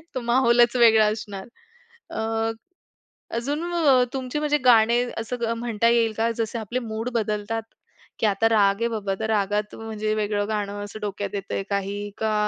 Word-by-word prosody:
तो 255 Hz, -, -1 dB
माहौलच 240 Hz, 0 st, +4 dB
वेगळा 225 Hz, -3 st, +6 dB
असणार. 205 Hz, -3 st, -6 dB, 0.6 s
अ, -, -, -5 dB, 1.2 s
अजून 285 Hz, +7 st, -2 dB
अ, 275 Hz, -7 st, +4 dB
तुमची 260 Hz, +2 st, -3 dB
म्हणजे 295 Hz, 0 st, +1 dB
गाणे 235 Hz, -1 st, +5 dB, 0.2 s
असं 230 Hz, 0 st, -2 dB
म्हणता 230 Hz, -1 st, +1 dB
येईल 230 Hz, -1 st, +3 dB
का 230 Hz, +1 st, +2 dB
जसे 225 Hz, 0 st, -2 dB
आपले 225 Hz, +3 st, -3 dB
मूड 225 Hz, 0 st, -4 dB
बदलतात, 215 Hz, 0 st, -1 dB, 0.6 s
की -, -, +2 dB
आता 215 Hz, +2 st, +2 dB
राग 200 Hz, -3 st, +3 dB
आहे 235 Hz, -, +2 dB
बाबा, 205 Hz, -4 st, -2 dB
तर 220 Hz, -, -1 dB
रागात 210 Hz, 0 st, 0 dB
म्हणजे 215 Hz, -1 st, -3 dB
वेगळं 205 Hz, -1 st, -1 dB
गाणं 205 Hz, -1 st, -3 dB
असं 205 Hz, +1 st, -9 dB
डोक्यात 205 Hz, 0 st, -4 dB
येतंय, 195 Hz, 0 st, -3 dB
काही 200 Hz, 0 st, -2 dB, 0.2 s
का 220 Hz, -1 st, 0 dB
220 Hz, 160 wpm, -24 LUFS, 205-235 Hz, 1.2 s, वेगळा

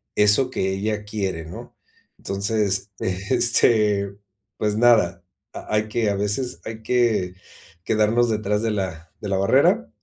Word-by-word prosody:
eso 105 Hz, +5 st, +4 dB
que 95 Hz, -6 st, -2 dB
ella 105 Hz, +2 st, -2 dB
quiere, 95 Hz, -6 st, -4 dB
¿no?, 85 Hz, +3 st, -11 dB, 0.4 s
entonces, 100 Hz, 0 st, -1 dB
eh, 90 Hz, -1 st, -2 dB
este, 110 Hz, -5 st, +3 dB, 0.4 s
pues 105 Hz, -1 st, -1 dB
nada, 115 Hz, -6 st, +3 dB, 0.3 s
ha -, -, -7 dB
hay 105 Hz, 0 st, 0 dB
que 110 Hz, 0 st, -1 dB
a 100 Hz, -, 0 dB
veces, 105 Hz, +6 st, -2 dB
hay 110 Hz, 0 st, -7 dB
que 110 Hz, -7 st, +1 dB, 0.5 s
quedarnos 110 Hz, +2 st, +2 dB
detrás 105 Hz, -1 st, -1 dB
de 115 Hz, -1 st, -1 dB
la 95 Hz, -5 st, -4 dB
de 105 Hz, -, -5 dB
la 95 Hz, -, 0 dB
barrera, 95 Hz, -, +3 dB
105 Hz, 145 wpm, -22 LUFS, 100-110 Hz, 0.5 s, eso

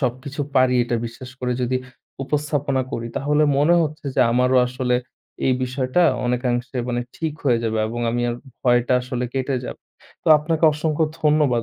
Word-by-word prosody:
সবকিছু 130 Hz, +3 st, -3 dB, 0.2 s
পারি, 130 Hz, -1 st, +4 dB
এটা 120 Hz, 0 st, -1 dB
বিশ্বাস 125 Hz, +2 st, -10 dB
করে 125 Hz, -1 st, -1 dB
যদি 130 Hz, +1 st, 0 dB, 0.5 s
উপস্থাপনা 145 Hz, -2 st, -1 dB
করি, 115 Hz, -, -3 dB
তাহলে 150 Hz, +2 st, +2 dB, 0.2 s
মনে 160 Hz, +4 st, +4 dB
হচ্ছে 155 Hz, -1 st, -4 dB
যে, -, -, +2 dB
আমারও 125 Hz, +1 st, +3 dB
আসলে 125 Hz, 0 st, -1 dB, 0.5 s
এই 130 Hz, -, +4 dB
বিষয়টা 130 Hz, +5 st, 0 dB, 0.2 s
অনেকাংশে 125 Hz, +1 st, -1 dB
মানে, 120 Hz, 0 st, -1 dB, 0.2 s
ঠিক 160 Hz, -2 st, -2 dB
হয়ে 120 Hz, -4 st, +3 dB
যাবে 110 Hz, -1 st, -1 dB
এবং 120 Hz, +1 st, -4 dB
আমি 120 Hz, +1 st, -1 dB
আর 120 Hz, -, -2 dB, 0.3 s
ভয়টা 120 Hz, 0 st, +3 dB
আসলে 125 Hz, 0 st, -3 dB
কেটে 135 Hz, 0 st, -1 dB
যাবে। -, -, -7 dB, 0.4 s
তো, -, -, -1 dB
আপনাকে 160 Hz, +2 st, 0 dB
অসংখ্য 155 Hz, +1 st, 0 dB, 0.2 s
ধন্যবাদ 150 Hz, -6 st, +3 dB
130 Hz, 165 wpm, -22 LUFS, 125-150 Hz, 0.5 s, পারি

